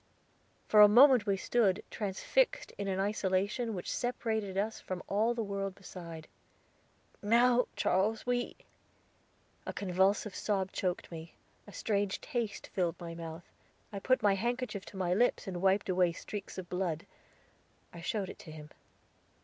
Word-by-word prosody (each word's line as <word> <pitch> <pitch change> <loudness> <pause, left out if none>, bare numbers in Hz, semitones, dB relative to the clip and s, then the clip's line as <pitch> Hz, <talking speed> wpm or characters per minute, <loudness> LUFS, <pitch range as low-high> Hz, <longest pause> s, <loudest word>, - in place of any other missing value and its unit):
For 210 - +7
a 210 - +11
moment 245 0 +7
we 195 -1 +2
stood, 205 -2 +2
transfixed 355 - 0
in 200 - -2
an 190 -1 -1
isolation 205 +3 0
which 180 - -4
separated 220 -5 -2
us 215 +2 -1
from 185 -1 -5
all 220 +4 +1
the 230 - -1
world 195 -2 -3
beside. 170 -4 -9 0.9
"Now 240 +3 +4
Charles, 210 +4 +1
we" 245 0 -1 1.1
a - - -4
convulsive 195 +2 +1
sob 190 -3 -1
choked 180 -2 -2
me, 165 0 -9 0.3
a - - -10
strange 200 -2 -1
taste 230 -4 -4
filled 175 -3 0
my 170 -1 -6
mouth, 165 0 -8 0.5
I 200 - -3
put 255 +3 +2
my 205 -1 +5
handkerchief 235 -1 -2
to 195 - -10
my 180 -2 +1
lips 240 +6 +2
and 180 -2 -4
wiped 195 +1 +3
away 180 -2 +2
streaks 200 +3 -7
of 185 -2 -6
blood. 180 -3 -2 0.9
I 170 - -9
showed 195 +2 -2
it - - -10
to 160 - -11
him. 150 -1 -10
195 Hz, 150 wpm, -32 LUFS, 185-220 Hz, 1.1 s, a